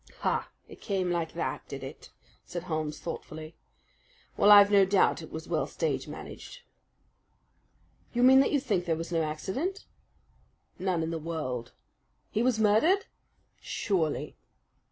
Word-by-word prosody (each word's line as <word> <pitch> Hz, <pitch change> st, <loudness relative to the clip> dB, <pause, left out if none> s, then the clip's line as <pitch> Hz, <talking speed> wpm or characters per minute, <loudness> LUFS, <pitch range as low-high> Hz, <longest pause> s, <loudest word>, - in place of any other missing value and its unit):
"Ha! -, -, 0 dB, 0.2 s
It -, -, -14 dB
came 190 Hz, -4 st, -1 dB
like 170 Hz, -2 st, -2 dB
that, -, -, -3 dB
did -, -, -7 dB
it?" -, -, -9 dB, 0.3 s
said 175 Hz, -1 st, -6 dB
Holmes 155 Hz, -3 st, -3 dB
thoughtfully. 155 Hz, -1 st, -7 dB, 0.8 s
"Well, 205 Hz, -, +4 dB
I've 205 Hz, -1 st, +9 dB
no 200 Hz, -1 st, +7 dB
doubt 195 Hz, +1 st, +3 dB
it -, -, -10 dB
was -, -, -7 dB
well -, -, 0 dB
stage 485 Hz, -, -2 dB
managed." -, -, -9 dB, 1.5 s
"You 240 Hz, 0 st, +1 dB
mean 265 Hz, +1 st, +8 dB
that 270 Hz, -, +3 dB
you 285 Hz, -, +3 dB
think 205 Hz, -10 st, -1 dB
there 165 Hz, -2 st, +1 dB
was 165 Hz, +2 st, -6 dB
no 165 Hz, -1 st, +1 dB
accident?" 190 Hz, -, -3 dB, 0.9 s
"None 180 Hz, -3 st, 0 dB
in 160 Hz, -, -2 dB
the 165 Hz, -, -3 dB
world." 150 Hz, -7 st, -4 dB, 0.6 s
"He 215 Hz, -, 0 dB
was 245 Hz, -1 st, +2 dB
murdered?" 220 Hz, -, +3 dB, 0.5 s
"Surely!" 155 Hz, -, -1 dB
185 Hz, 145 wpm, -29 LUFS, 160-220 Hz, 1.5 s, I've